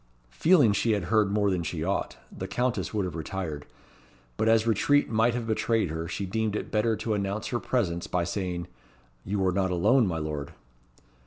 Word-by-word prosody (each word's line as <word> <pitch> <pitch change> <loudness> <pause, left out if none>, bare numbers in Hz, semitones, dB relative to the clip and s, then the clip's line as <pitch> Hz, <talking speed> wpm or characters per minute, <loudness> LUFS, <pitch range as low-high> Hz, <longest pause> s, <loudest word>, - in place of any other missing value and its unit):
Feeling 150 - +4
she 110 +3 +1
had 100 -3 -1
heard 105 -2 +4
more 100 -1 +2
than 90 -2 0
she 80 -1 -3
ought, 95 +3 -2 0.2
the 95 - -5
Countess 125 +6 -1
would 105 -3 -1
have 90 - -4
retired; 80 -3 -5 0.7
but 110 - +1
as 115 0 +4
retreat 130 +6 +2
might 115 +2 +2
have 120 -2 -3
betrayed 110 -4 0
her, 80 +1 -4
she 100 +3 -3
deemed 110 +2 -1
it - - -4
better 110 +1 +2
to 110 0 -2
announce 100 +1 -2
her 120 - -1
presence 90 -11 -1
by 90 -1 0
saying, 90 0 -3 0.6
"You 95 0 -1
are 95 - +3
not 95 0 0
alone, 105 +7 +3
my 85 -3 -2
Lord." 75 -2 -4
100 Hz, 190 wpm, -27 LUFS, 90-110 Hz, 0.7 s, Feeling